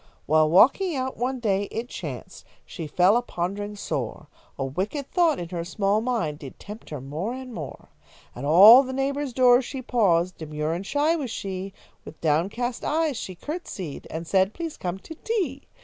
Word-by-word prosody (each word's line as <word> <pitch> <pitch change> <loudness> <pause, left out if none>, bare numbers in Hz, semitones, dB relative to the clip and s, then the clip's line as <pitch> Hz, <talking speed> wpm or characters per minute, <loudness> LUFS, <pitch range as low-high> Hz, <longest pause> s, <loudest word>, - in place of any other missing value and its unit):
While 155 0 +4
walking 285 - +5
out 260 0 -2
one 255 +2 -2
day, 205 -3 +1
it 230 +2 -4
chanced - - -7 0.2
She 165 -4 -7
fell 180 +7 +4
a - - +1
pondering 205 0 -4
sore. 140 - -4 0.3
A 135 - -2
wicked 200 - -3
thought 335 -5 +3
in 170 -1 -6
her 170 -2 -3
small 200 +4 0
mind 200 -12 -1
Did 135 -3 -10
tempt 210 +2 -10
her 150 - -5
more 155 - -4
and 260 -1 -8
more. 155 -9 -8 0.5
At 125 - -7
all 200 - +9
the 260 -1 -5
neighbours' 275 +1 -1
doors 250 +1 +5
she 260 +1 -6
paused, 185 -8 +2
Demure 155 0 -3
and 185 +4 -5
shy 295 +3 +2
was 285 -7 -3
she. 195 -3 -5 0.3
With - - -12
downcast 195 +11 0
eyes, 315 -2 0
she 185 -4 -6
courtesied, 200 - -6
And 165 +1 -5
said, 190 +4 +2
"_Please 330 -2 -5
come 180 0 -3
to 320 - -10
tea. 325 - -3
205 Hz, 180 wpm, -25 LUFS, 170-260 Hz, 0.5 s, all